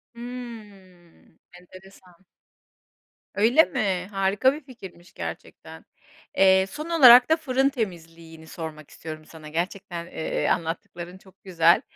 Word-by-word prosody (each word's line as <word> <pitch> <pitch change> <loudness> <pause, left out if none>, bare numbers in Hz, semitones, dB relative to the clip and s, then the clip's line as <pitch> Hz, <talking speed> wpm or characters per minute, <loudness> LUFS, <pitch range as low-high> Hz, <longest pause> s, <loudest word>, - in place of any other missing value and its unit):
Hımm, 210 -9 -12
enteresan. 185 0 -17 1.1
Öyle 240 +10 +5
mi, 195 - -2
harika 195 +6 +2
bir 300 - -8
fikirmiş 190 - -14
gerçekten. - - -9 0.5
Eee, 190 0 +5
son 305 +7 -7
olarak 255 -6 +8
da 320 - +4
fırın 270 -3 +1
temizliğini 165 - -7
sormak 155 -3 -8
istiyorum 155 -1 -9
sana 155 -1 -12
gerçekten, 170 +1 -4
eee, 160 - -3
anlattıkların 170 +2 -4
çok 190 0 -22
güzel. 170 -2 +3
190 Hz, 110 wpm, -24 LUFS, 170-235 Hz, 1.1 s, olarak